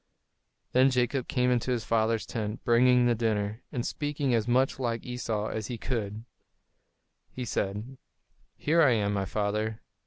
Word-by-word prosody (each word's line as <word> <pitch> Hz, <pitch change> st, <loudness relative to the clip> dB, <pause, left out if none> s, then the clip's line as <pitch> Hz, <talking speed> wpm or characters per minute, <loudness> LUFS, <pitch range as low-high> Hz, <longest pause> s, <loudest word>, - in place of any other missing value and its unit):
Then 130 Hz, +2 st, +5 dB
Jacob 125 Hz, 0 st, 0 dB
came 125 Hz, -1 st, +1 dB
into 125 Hz, 0 st, 0 dB
his 120 Hz, -3 st, 0 dB
father's 115 Hz, 0 st, +1 dB
tent, 105 Hz, -2 st, -4 dB
bringing 125 Hz, +1 st, +5 dB
the 120 Hz, -, +4 dB
dinner, 110 Hz, -1 st, -1 dB
and 120 Hz, -2 st, -2 dB
speaking 145 Hz, -3 st, -1 dB
as 115 Hz, -1 st, +1 dB
much 130 Hz, +2 st, +2 dB
like 115 Hz, -3 st, -2 dB
Esau 115 Hz, -4 st, -2 dB
as 110 Hz, -1 st, -4 dB
he 120 Hz, -, -4 dB
could, 110 Hz, -2 st, -3 dB, 1.0 s
he 125 Hz, -, -6 dB
said: 105 Hz, +5 st, -3 dB, 0.6 s
"Here 165 Hz, +3 st, +3 dB
I 140 Hz, -6 st, +6 dB
am, 105 Hz, -2 st, +1 dB
my 100 Hz, -1 st, -1 dB
father." 105 Hz, +3 st, -1 dB
115 Hz, 155 wpm, -28 LUFS, 110-125 Hz, 1.0 s, I